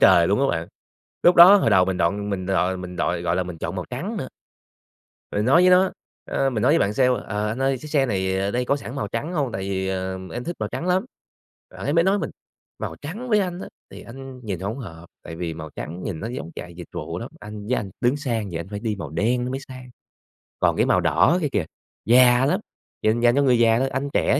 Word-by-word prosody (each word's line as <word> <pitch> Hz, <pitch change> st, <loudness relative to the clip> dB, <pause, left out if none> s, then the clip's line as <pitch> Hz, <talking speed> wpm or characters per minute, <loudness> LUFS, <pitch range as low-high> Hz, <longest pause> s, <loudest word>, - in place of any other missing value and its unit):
trời 85 Hz, 0 st, +6 dB
luôn 100 Hz, +7 st, +2 dB
á 140 Hz, -, +3 dB
bạn. 80 Hz, -, -7 dB, 0.5 s
Lúc 175 Hz, -, +6 dB
đó, 180 Hz, +4 st, +10 dB
hồi 180 Hz, -, +2 dB
đầu 95 Hz, -3 st, +5 dB
mình 95 Hz, -1 st, -1 dB
gọi 100 Hz, +4 st, 0 dB
mình 95 Hz, -2 st, -3 dB
gọi 95 Hz, -1 st, +1 dB
mình 90 Hz, -1 st, -7 dB
gọi 85 Hz, -1 st, -1 dB
gọi 85 Hz, 0 st, 0 dB
là 95 Hz, -, +1 dB
mình 90 Hz, -2 st, -7 dB
chọn -, -, -4 dB
màu -, -, -3 dB
trắng -, -, -4 dB
nữa. -, -, -4 dB, 1.0 s
Mình 105 Hz, -, 0 dB
nói 140 Hz, +8 st, +5 dB
với 185 Hz, -, +6 dB
nó, 185 Hz, +1 st, +5 dB, 0.4 s
ờ, 135 Hz, -, +1 dB
mình 110 Hz, -4 st, -2 dB
nói 135 Hz, +4 st, +4 dB
với 165 Hz, -, +4 dB
bạn 100 Hz, +1 st, +1 dB
sale: 130 Hz, +1 st, +4 dB, 0.2 s
"Ờ, 105 Hz, 0 st, -2 dB
anh 120 Hz, +5 st, -3 dB
ơi, 135 Hz, 0 st, +2 dB
cái 155 Hz, -, -7 dB
xe 140 Hz, -3 st, +2 dB
này 95 Hz, -3 st, 0 dB
ở 100 Hz, -, 0 dB
đây 125 Hz, +3 st, -1 dB
có 140 Hz, -, +1 dB
sẵn 135 Hz, -3 st, -8 dB
màu 105 Hz, -7 st, -2 dB
trắng 140 Hz, -, -4 dB
hông? 140 Hz, -8 st, -1 dB
Tại 95 Hz, -, -4 dB
vì, 95 Hz, -1 st, -2 dB
ờ, 95 Hz, 0 st, -3 dB
em 120 Hz, -, -5 dB
thích 175 Hz, -, -4 dB
màu -, -, -1 dB
trắng 175 Hz, -, -4 dB
lắm." 185 Hz, +4 st, +2 dB, 0.6 s
Ảnh 145 Hz, -, -3 dB
mới 170 Hz, 0 st, +4 dB
nói 195 Hz, +2 st, +3 dB
mình: 150 Hz, -, -3 dB, 0.5 s
"Màu 80 Hz, -, -5 dB
trắng 210 Hz, +12 st, -6 dB
với 215 Hz, -, +4 dB
anh 180 Hz, -1 st, -3 dB
á, -, -, -7 dB, 0.2 s
thì -, -, -10 dB
anh 130 Hz, +1 st, -10 dB
nhìn 95 Hz, -5 st, -4 dB
hông 110 Hz, +7 st, -4 dB
hợp, 85 Hz, -7 st, -9 dB, 0.2 s
tại 80 Hz, -, -8 dB
vì 85 Hz, -2 st, -4 dB
màu 80 Hz, -1 st, -8 dB
trắng 85 Hz, +4 st, -6 dB
nhìn 85 Hz, -6 st, -4 dB
nó 115 Hz, -, -4 dB
giống 100 Hz, -10 st, -6 dB
chạy 85 Hz, -1 st, -8 dB
dịch 85 Hz, -1 st, -10 dB
vụ 80 Hz, +3 st, -5 dB
lắm. 120 Hz, -, -6 dB
Anh 105 Hz, 0 st, -8 dB
với 125 Hz, -, +1 dB
anh 100 Hz, -2 st, -4 dB
tướng 125 Hz, +4 st, +2 dB
sang 115 Hz, -8 st, -2 dB
vậy, 80 Hz, -, -4 dB
anh 85 Hz, -, -8 dB
phải 105 Hz, 0 st, -5 dB
đi 110 Hz, -3 st, -2 dB
màu -, -, -6 dB
đen 120 Hz, +9 st, 0 dB
nó 125 Hz, -, -3 dB
mới 135 Hz, +1 st, -3 dB
sang. 130 Hz, -1 st, -10 dB, 0.7 s
Còn -, -, +2 dB
cái -, -, +3 dB
màu -, -, +3 dB
đỏ 170 Hz, +5 st, +3 dB
kia 150 Hz, -, +1 dB
kìa, 100 Hz, -6 st, 0 dB, 0.4 s
già 125 Hz, +1 st, +6 dB
lắm, 140 Hz, -, +1 dB, 0.4 s
dành 110 Hz, +2 st, +2 dB
dành 120 Hz, +1 st, +4 dB
cho 140 Hz, -, +4 dB
người 125 Hz, -3 st, +4 dB
già 115 Hz, 0 st, +4 dB
thôi. 135 Hz, -, +1 dB
Anh 140 Hz, +1 st, -2 dB
trẻ 140 Hz, -, +2 dB
115 Hz, 265 wpm, -23 LUFS, 95-135 Hz, 1.0 s, đó